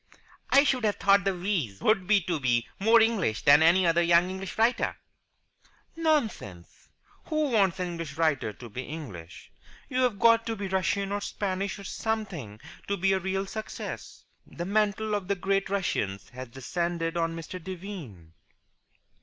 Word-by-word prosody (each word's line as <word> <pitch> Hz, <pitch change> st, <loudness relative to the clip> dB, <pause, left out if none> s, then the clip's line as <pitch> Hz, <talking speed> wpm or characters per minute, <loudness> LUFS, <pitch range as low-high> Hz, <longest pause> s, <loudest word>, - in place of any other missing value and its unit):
"I 275 Hz, -, +6 dB
should 260 Hz, -4 st, +1 dB
have 210 Hz, -2 st, +2 dB
thought 200 Hz, 0 st, +3 dB
the 195 Hz, -1 st, +1 dB
wheeze 175 Hz, -, -2 dB
would 215 Hz, -4 st, +2 dB
be 210 Hz, -2 st, +4 dB
to 170 Hz, -2 st, -2 dB
be 120 Hz, -3 st, +1 dB
more 225 Hz, +4 st, +6 dB
English 220 Hz, -, +1 dB
than 145 Hz, +1 st, +7 dB
any 175 Hz, +3 st, +5 dB
other 170 Hz, 0 st, +3 dB
young 170 Hz, +1 st, +4 dB
English 190 Hz, 0 st, -6 dB
writer." 230 Hz, +3 st, +2 dB, 1.0 s
"Nonsense! 230 Hz, -, -2 dB, 0.4 s
Who 310 Hz, -3 st, 0 dB
wants 195 Hz, -5 st, +2 dB
an 180 Hz, -1 st, -2 dB
English 165 Hz, -4 st, -6 dB
writer 155 Hz, -9 st, +1 dB
to 120 Hz, +3 st, -11 dB
be 115 Hz, +4 st, -6 dB
English? 130 Hz, -, -9 dB, 0.4 s
You've 250 Hz, -4 st, +1 dB
got 230 Hz, +2 st, +4 dB
to 225 Hz, -, -1 dB
be 200 Hz, -2 st, -4 dB
Russian 190 Hz, +1 st, 0 dB
or 205 Hz, 0 st, -1 dB
Spanish 195 Hz, -1 st, -3 dB
or 200 Hz, -, -10 dB
something 190 Hz, -, -4 dB, 0.3 s
to 200 Hz, -, -1 dB
be 195 Hz, +1 st, +2 dB
a 190 Hz, -, +1 dB
real 190 Hz, +1 st, -2 dB
success. 215 Hz, +2 st, -7 dB, 0.2 s
The 175 Hz, -, -6 dB
mantle 210 Hz, +2 st, 0 dB
of 205 Hz, -3 st, -2 dB
the 200 Hz, -, +1 dB
great 195 Hz, +1 st, 0 dB
Russians 100 Hz, -, -2 dB
has 130 Hz, 0 st, -8 dB
descended 165 Hz, +6 st, -3 dB
on 165 Hz, -1 st, -1 dB
Mr. 165 Hz, +2 st, -7 dB
Devine." 165 Hz, -, -8 dB
190 Hz, 160 wpm, -28 LUFS, 160-205 Hz, 1.0 s, than